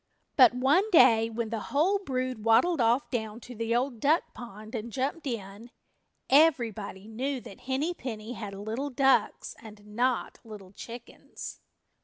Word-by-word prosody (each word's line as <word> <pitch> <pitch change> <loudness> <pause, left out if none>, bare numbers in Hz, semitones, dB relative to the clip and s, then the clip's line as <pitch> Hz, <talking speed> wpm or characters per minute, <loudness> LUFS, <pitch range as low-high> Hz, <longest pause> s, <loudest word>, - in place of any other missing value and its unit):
But 250 -3 +7
one 290 +12 +3
day 225 - +6
when 230 0 -4
the 225 - -2
whole 355 +8 +2
brood 255 - -3
waddled 245 +8 +4
off 235 +4 +2
down 220 -3 -3
to 245 - -10
the 230 0 -1
Old 245 -1 -1
Duck 305 +7 +1
Pond 215 -2 -10
and 230 0 -5
jumped 275 +5 -3
in 215 -1 -6 0.6
everybody 235 -9 +2
knew 260 +5 -3
that 195 - -12
Henny 290 +7 0
Penny 230 -6 -6
had 205 -5 -7
little 220 +8 -4
ducks 270 0 +1
and 210 -2 -13
not 240 +4 -1
little 210 -4 -11
chickens. 235 +4 -10
235 Hz, 150 wpm, -28 LUFS, 220-270 Hz, 0.6 s, But